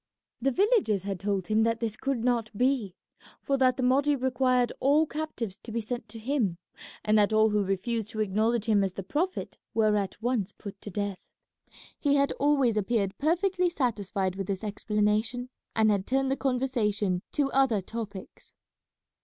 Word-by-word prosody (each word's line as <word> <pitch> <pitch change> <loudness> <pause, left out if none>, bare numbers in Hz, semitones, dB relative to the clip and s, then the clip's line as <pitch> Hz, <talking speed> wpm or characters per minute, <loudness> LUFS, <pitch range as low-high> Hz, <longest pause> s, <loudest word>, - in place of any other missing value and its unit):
The 270 - +3
villagers 370 - +2
had 195 -2 -3
told 195 -2 -1
him 215 +2 +2
that 230 0 +1
this 225 -2 -2
could 270 -2 -2
not 240 -3 +1
be, 250 -7 +1 0.4
for 275 - 0
that 255 -1 +3
the 260 - -1
Mahdi 280 +3 +3
required 255 -2 +1
all 290 +4 +4
captives 295 -11 -5
to 230 - -10
be 230 - -1
sent 240 +2 -5
to 225 - -9
him, 225 -7 -1 0.5
and 215 0 +4
that 205 +1 +3
all 215 0 +4
who 210 -1 +2
refused 205 +3 -2
to 220 - -6
acknowledge 215 +2 +1
him 210 -3 +3
as 190 -2 -2
the 195 - -5
Prophet 335 - -2 0.2
were 215 -2 +3
at 200 -1 -2
once 220 -4 -1
put 200 -2 -10
to - - -7
death. 200 0 -3 0.8
He 285 -1 +2
had 280 0 +3
always 275 -6 +3
appeared 205 -2 0
perfectly 360 +4 +2
satisfied 205 - -1
with 195 -1 -3
this 195 +1 -3
explanation, 215 +4 0 0.3
and 220 -1 +4
had 195 -2 0
turned 270 +1 +1
the - - +2
conversation 230 -9 0
to 280 -2 +1
other 265 -6 +3
topics. 205 -1 -8
225 Hz, 175 wpm, -28 LUFS, 205-265 Hz, 0.8 s, all